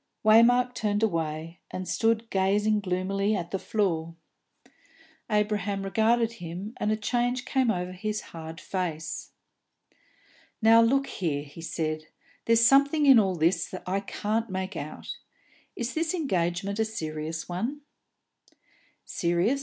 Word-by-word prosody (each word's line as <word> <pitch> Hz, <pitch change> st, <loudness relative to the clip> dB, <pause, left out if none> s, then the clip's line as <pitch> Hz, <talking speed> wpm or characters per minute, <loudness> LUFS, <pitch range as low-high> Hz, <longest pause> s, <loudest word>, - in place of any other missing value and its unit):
Waymark 245 Hz, +3 st, +6 dB
turned 210 Hz, -2 st, -1 dB
away, 165 Hz, -3 st, -2 dB
and 185 Hz, 0 st, -5 dB
stood 225 Hz, 0 st, +1 dB
gazing 205 Hz, +3 st, +2 dB
gloomily 195 Hz, +2 st, 0 dB
at 175 Hz, -3 st, -4 dB
the 195 Hz, -, -1 dB
floor. 170 Hz, -7 st, -1 dB, 1.1 s
Abraham 205 Hz, -2 st, 0 dB
regarded 225 Hz, +3 st, +2 dB
him, 180 Hz, +6 st, -6 dB
and 210 Hz, -, 0 dB
a -, -, +2 dB
change 245 Hz, +3 st, -1 dB
came 260 Hz, -3 st, +1 dB
over 180 Hz, -3 st, -1 dB
his 210 Hz, +3 st, -3 dB
hard 165 Hz, 0 st, -7 dB
face. 170 Hz, -4 st, -4 dB, 1.3 s
"Now, 225 Hz, 0 st, +7 dB
look 270 Hz, +4 st, +3 dB
here," 155 Hz, -, -2 dB
he 150 Hz, +3 st, -12 dB
said, 155 Hz, -1 st, -3 dB, 0.4 s
"there's 230 Hz, 0 st, +5 dB
something 280 Hz, +4 st, +5 dB
in 270 Hz, -4 st, +8 dB
all 190 Hz, -3 st, +1 dB
this 170 Hz, +2 st, +1 dB
I 190 Hz, +2 st, 0 dB
can't 215 Hz, +3 st, -2 dB
make 190 Hz, +1 st, -4 dB
out. -, -, -6 dB, 0.6 s
Is 240 Hz, +1 st, -3 dB
this 325 Hz, +2 st, 0 dB
engagement 195 Hz, -, -1 dB
a -, -, +4 dB
serious 160 Hz, -5 st, -4 dB
one?" 230 Hz, +12 st, -3 dB, 1.2 s
"Serious?" 175 Hz, +10 st, +1 dB
200 Hz, 130 wpm, -27 LUFS, 175-230 Hz, 1.3 s, in